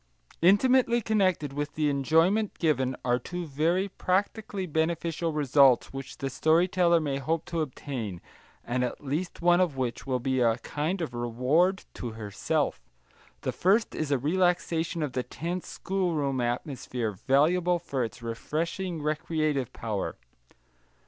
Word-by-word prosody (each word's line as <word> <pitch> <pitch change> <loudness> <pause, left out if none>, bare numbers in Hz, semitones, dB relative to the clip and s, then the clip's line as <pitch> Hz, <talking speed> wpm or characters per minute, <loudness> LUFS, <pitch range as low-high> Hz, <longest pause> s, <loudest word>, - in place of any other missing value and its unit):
Intimately 240 +6 +5
connected 185 - +1
with 145 +1 -4
the 155 -1 +1
enjoyment 165 +9 +2
given 135 -6 +1
are 125 0 +2
two 175 +7 -5
very 165 +6 +1
practically 195 +1 -1
beneficial 165 +1 -1
results 140 -4 +4
which 135 0 -7
the 135 - -3
story 160 +6 +3
teller 175 -2 +3
may 140 -3 -2
hope 160 +3 -1
to 170 -2 -2
obtain, 125 - -5 0.5
and 125 +1 0
at 125 - -4
least 165 +6 -3
one 175 +1 +5
of 165 -7 0
which 125 0 -3
will 130 -1 +1
be 130 0 0
a 115 -1 +3
kind 155 +8 -3
of 155 -7 -3
reward 130 - +1
to 120 -3 -6
herself. 105 -2 -2 0.6
The - - -1
first 205 +5 +2
is 155 - -2
a 140 - +3
relaxation 170 +2 0
of 140 -4 -3
the 125 - 0
tense 170 +7 -5
schoolroom 160 -9 -1
atmosphere, 120 -2 -2
valuable 160 - +2
for 140 -7 -2
its 120 +1 -6
refreshing 160 +8 -3
recreative 155 -3 -1
power. 110 -4 -3
155 Hz, 140 wpm, -28 LUFS, 130-175 Hz, 0.6 s, Intimately